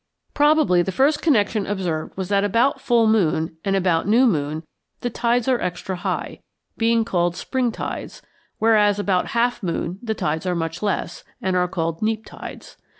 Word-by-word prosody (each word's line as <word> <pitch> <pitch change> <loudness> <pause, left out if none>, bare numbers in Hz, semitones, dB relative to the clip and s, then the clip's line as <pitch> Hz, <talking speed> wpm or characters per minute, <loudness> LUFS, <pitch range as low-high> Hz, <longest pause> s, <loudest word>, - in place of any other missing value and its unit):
Probably 295 - +4
the 190 - -2
first 280 +9 +2
connection 215 -8 +2
observed 180 -6 -3
was 190 -1 -3
that 200 -1 +2
about 245 +7 +2
full 235 -2 +3
moon 160 -7 +1
and 195 -1 0
about 180 -3 +1
new 235 +5 +5
moon 155 - 0 0.4
the 245 - -2
tides 235 +1 0
are 255 -2 +2
extra 180 +1 -3
high, 175 - -3 0.4
being 230 0 +2
called 175 -5 0
spring 255 +2 -1
tides, - - -6 0.3
whereas 210 -2 +4
about 195 -3 0
half 240 +1 +1
moon 180 0 -3
the 220 -2 -2
tides 160 +1 -2
are 180 - 0
much 165 0 -3
less, 200 -4 -2 0.2
and 190 -1 -1
are 180 0 +2
called 165 -2 -3
neap 220 0 -1
tides. - - -10
200 Hz, 170 wpm, -22 LUFS, 175-230 Hz, 0.4 s, new